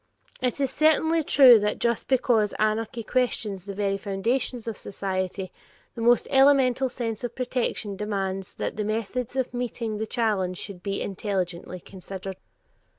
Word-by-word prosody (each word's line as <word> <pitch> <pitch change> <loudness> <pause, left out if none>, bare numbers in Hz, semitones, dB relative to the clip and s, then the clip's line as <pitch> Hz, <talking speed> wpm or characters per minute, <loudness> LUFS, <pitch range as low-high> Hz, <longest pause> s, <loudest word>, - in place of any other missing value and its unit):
It 250 0 -1
is 275 -2 +1
certainly 315 +1 +3
true 260 -6 +7
that 210 0 -1
just 235 -2 0
because 240 -5 +2
anarchy 220 +2 0
questions 210 -6 -1
the 200 -1 -6
very 200 -1 0
foundations 225 +5 -1
of 225 - -3
society, 190 -1 -4 0.4
the 230 - -7
most 240 +1 +4
elemental 265 -2 +4
sense 230 -2 -4
of 245 - -4
protection 240 -5 -2
demands 195 -2 -3
that - - -4
the 215 - 0
method 225 +4 -3
of 260 -2 -1
meeting 235 -3 -3
the 220 +1 -3
challenge 205 -6 0
should 190 -2 -7
be 195 +1 -2
intelligently 185 -3 -3
considered. 190 +1 -8
220 Hz, 150 wpm, -26 LUFS, 195-245 Hz, 0.4 s, true